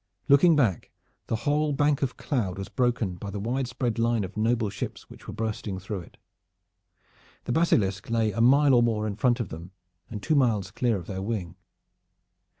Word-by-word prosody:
Looking 155 Hz, +4 st, +6 dB
back, 115 Hz, -, +1 dB, 0.4 s
the -, -, 0 dB
whole 150 Hz, +1 st, +1 dB
bank 145 Hz, 0 st, +2 dB
of 125 Hz, -4 st, -2 dB
cloud 100 Hz, -10 st, -2 dB
was 95 Hz, 0 st, -6 dB
broken 115 Hz, -6 st, 0 dB
by 100 Hz, +3 st, -6 dB
the 100 Hz, +1 st, -5 dB
widespread 120 Hz, +1 st, -2 dB
line 115 Hz, -2 st, +1 dB
of 95 Hz, +1 st, -7 dB
noble 110 Hz, -1 st, +1 dB
ships 95 Hz, -, -6 dB
which -, -, -14 dB
were -, -, -6 dB
bursting 110 Hz, -3 st, -3 dB
through 95 Hz, +2 st, -5 dB
it. 85 Hz, -, -14 dB, 1.3 s
The -, -, -4 dB
Basilisk 105 Hz, -, +1 dB
lay 115 Hz, -2 st, +1 dB
a 110 Hz, +3 st, -2 dB
mile 140 Hz, +3 st, +5 dB
or 120 Hz, -, +6 dB
more 110 Hz, -2 st, +1 dB
in 105 Hz, -2 st, -3 dB
front 120 Hz, +3 st, +2 dB
of 115 Hz, -, -3 dB
them 85 Hz, +4 st, -9 dB, 0.4 s
and 105 Hz, -3 st, -7 dB
two 160 Hz, -, +1 dB
miles 110 Hz, -9 st, +2 dB
clear 115 Hz, +1 st, 0 dB
of 90 Hz, -, -8 dB
their 95 Hz, 0 st, -5 dB
wing. 95 Hz, -5 st, -4 dB
115 Hz, 185 wpm, -26 LUFS, 100-125 Hz, 1.3 s, Looking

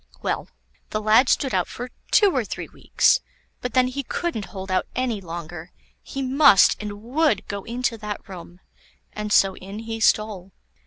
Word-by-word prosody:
Well, -, -, -2 dB, 0.4 s
the 215 Hz, -, -2 dB
lad 220 Hz, +5 st, +4 dB
stood 270 Hz, -, +1 dB
out -, -, +1 dB
for 245 Hz, +1 st, -7 dB, 0.2 s
two 400 Hz, -6 st, +4 dB
or 255 Hz, -, +2 dB
three -, -, -6 dB
weeks, -, -, +2 dB, 0.4 s
but 250 Hz, -2 st, -4 dB
then 255 Hz, 0 st, +5 dB
he 265 Hz, +2 st, -3 dB
couldn't 275 Hz, -, -3 dB
hold 190 Hz, +1 st, -8 dB
out 185 Hz, -, +1 dB
any 245 Hz, -5 st, -1 dB
longer; 170 Hz, -1 st, -8 dB, 0.3 s
he 275 Hz, -, -5 dB
must 265 Hz, -6 st, +6 dB
and 205 Hz, 0 st, -7 dB
would 265 Hz, -2 st, +1 dB
go 200 Hz, -1 st, -5 dB
into 240 Hz, -1 st, -2 dB
that 210 Hz, -1 st, -6 dB
room, 180 Hz, -1 st, -11 dB, 0.5 s
and 210 Hz, 0 st, -5 dB
so 195 Hz, -2 st, +4 dB
in 195 Hz, +2 st, -9 dB
he 225 Hz, 0 st, -5 dB
stole. 210 Hz, -4 st, +1 dB
215 Hz, 170 wpm, -23 LUFS, 195-255 Hz, 0.5 s, must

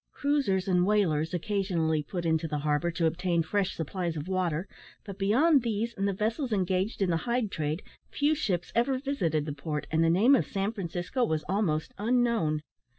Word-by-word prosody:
Cruisers 275 Hz, -11 st, 0 dB
and 180 Hz, -2 st, +3 dB
whalers 175 Hz, -6 st, +2 dB
occasionally 175 Hz, -4 st, 0 dB
put 175 Hz, +4 st, -5 dB
into 160 Hz, 0 st, +1 dB
the 150 Hz, -1 st, -2 dB
harbour 150 Hz, +3 st, 0 dB
to 170 Hz, 0 st, -1 dB
obtain 170 Hz, +1 st, +1 dB
fresh 195 Hz, +3 st, -1 dB
supplies 170 Hz, +1 st, -3 dB
of 150 Hz, +3 st, -5 dB
water, 185 Hz, -2 st, -1 dB, 0.4 s
but 200 Hz, -1 st, -8 dB
beyond 265 Hz, +10 st, +4 dB
these 230 Hz, 0 st, -2 dB
and 195 Hz, -1 st, -1 dB
the -, -, +1 dB
vessels 225 Hz, +6 st, -1 dB
engaged 190 Hz, +1 st, 0 dB
in 180 Hz, -, +1 dB
the 165 Hz, -, +2 dB
hide 235 Hz, -4 st, 0 dB
trade 155 Hz, +3 st, -2 dB, 0.3 s
few 290 Hz, +2 st, +1 dB
ships 190 Hz, -, -2 dB
ever 255 Hz, +3 st, +2 dB
visited 180 Hz, -, -1 dB
the 150 Hz, -, -3 dB
port, 150 Hz, +1 st, -4 dB
and 160 Hz, +1 st, +3 dB
the 165 Hz, -, +4 dB
name 205 Hz, +11 st, +5 dB
of 270 Hz, -, +3 dB
San 195 Hz, +1 st, -1 dB
Francisco 185 Hz, +4 st, -3 dB
was 160 Hz, -8 st, 0 dB
almost 180 Hz, -6 st, 0 dB
unknown. 225 Hz, -10 st, +1 dB
185 Hz, 185 wpm, -28 LUFS, 160-220 Hz, 0.4 s, name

